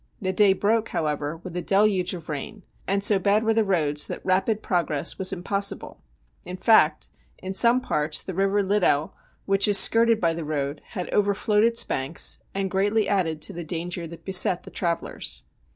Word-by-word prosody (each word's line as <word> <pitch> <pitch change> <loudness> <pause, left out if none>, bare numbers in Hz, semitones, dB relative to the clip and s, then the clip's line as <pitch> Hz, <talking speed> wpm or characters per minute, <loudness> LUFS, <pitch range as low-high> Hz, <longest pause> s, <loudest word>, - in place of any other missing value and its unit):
The 190 -2 -2
day 200 0 +4
broke, 220 +3 0
however, 150 0 -3
with 180 -2 -9
a 180 - -2
deluge 195 -2 +1
of 170 -3 -11
rain, 160 +7 -7 0.2
and 195 +1 0
so 200 -1 +4
bad 200 +3 +1
were 225 0 +1
the 225 0 +2
roads 155 -7 0
that - - -8
rapid 195 +4 0
progress 165 -6 -2
was 190 0 +1
impossible. 195 +2 -2 0.4
In 180 +1 -8
fact, 220 +3 +3 0.3
in 190 +1 -7
some 235 +5 +4
parts 150 -7 -1
the 190 - -7
River 195 +2 0
Liddel, 190 -7 +1 0.3
which 195 +1 +3
is 205 -1 +6
skirted 230 +2 +5
by 170 -4 0
the 165 0 -6
road, 145 -1 -4 0.2
had 180 - -4
overflowed 210 +1 +1
its 230 0 +4
banks, 135 +5 -1
and 195 -1 -3
greatly 205 +2 0
added 165 -6 -1
to - - -2
the 175 - -6
danger 170 +1 -4
that 170 +1 -13
beset 185 -1 +3
the - - -12
travellers. 170 -1 -3
190 Hz, 185 wpm, -24 LUFS, 165-205 Hz, 0.4 s, is